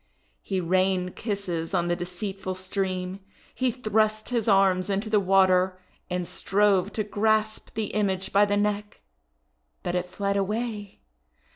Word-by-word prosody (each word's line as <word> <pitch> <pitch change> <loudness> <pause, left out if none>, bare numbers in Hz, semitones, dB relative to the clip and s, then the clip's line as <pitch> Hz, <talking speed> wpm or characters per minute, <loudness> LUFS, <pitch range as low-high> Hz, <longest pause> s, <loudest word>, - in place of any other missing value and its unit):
He 190 -2 -2
rained 185 +1 +1
kisses 195 -5 -3
on 175 -1 +1
the 175 - +1
deceitful 185 +2 -5
stream. 185 0 -3 0.3
He 255 -1 +1
thrust 215 -2 0
his 235 -3 0
arms 195 -2 +4
into 200 +2 -1
the 210 - +5
water, 185 -1 +3 0.3
and 180 -1 -2
strove 200 -1 +2
to 215 - -1
grasp 215 +1 0
the 215 -2 -2
image 195 -3 0
by 200 +1 +6
the 205 0 0
neck, 210 0 -1 0.8
but 175 - -2
it 180 0 -1
fled 200 +2 -1
away. 210 0 -3
195 Hz, 140 wpm, -26 LUFS, 185-210 Hz, 0.8 s, by